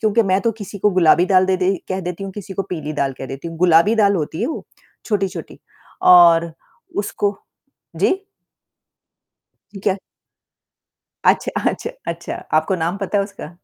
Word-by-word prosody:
क्योंकि 220 +1 +3
मैं 195 -1 +1
तो 230 - 0
किसी 205 -2 -9
को 210 +2 +3
गुलाबी 180 -1 +4
दाल 185 -1 +4
दे 190 -1 +2 0.3
कह 190 0 -2
देती 180 +1 -5
हूँ 195 - -6
किसी 195 -1 -8
को 195 - -1
पीली 155 -3 -4
दाल 140 -2 -1
कह 135 - -6
देती 135 +6 -7
हूँ, 165 - -9
गुलाबी 175 +4 +5
दाल 200 -2 +4
होती 160 +2 -3
है 235 - +1
वो, 315 - -5 0.4
छोटी-छोटी 195 -5 -3 0.5
और 170 -1 +6 0.4
उसको 205 0 -1 0.6
जी? 380 - +1 1.5
ठीक 195 - -10
है। 195 - +1 1.3
अच्छा, - - -1 0.2
अच्छा 465 - -5 0.2
अच्छा - - -7 0.2
आपको 160 +5 0
नाम 175 +4 -1
पता 200 0 -1
है 200 - +1
उसका? 175 -4 -10
190 Hz, 165 wpm, -20 LUFS, 170-205 Hz, 1.5 s, और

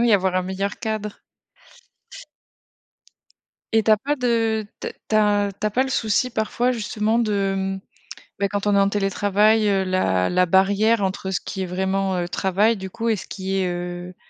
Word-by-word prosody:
Oui, 235 -2 +4
avoir 190 -2 +2
un 185 - +1
meilleur 190 +2 -3
cadre. 215 -1 -4 2.5
Et 225 -1 +3
tu 220 - +2
as 215 - +7
pas 285 +8 -2
de 225 -4 0
te - - -3
tu - - -7
as 205 -1 +2
tu 215 - 0
as - - 0
pas 255 +5 +1
le - - -4
souci 225 +2 +1
parfois 235 +3 0
justement 220 -1 -1
de, 200 -3 0
mmh, 190 0 -2 0.6
beh, 200 - +2
quand 205 +1 -3
on 205 - +3
est - - +5
en 195 0 +3
télétravail, 205 +2 +2
heu, 195 -1 +2
la 185 - +1
la 180 0 +3
barrière 200 +4 +3
entre 190 0 -2
ce 190 - -1
qui 190 - -6
est 185 - -1
vraiment, 190 +1 -1
heu, 175 -1 -2
travail 195 +5 +1
du 190 0 -6
coup 230 +3 -3
et 220 - +3
ce 190 - -8
qui 190 0 -3
est, 190 -1 +1
heu, 175 0 -5
200 Hz, 195 wpm, -22 LUFS, 190-220 Hz, 2.5 s, as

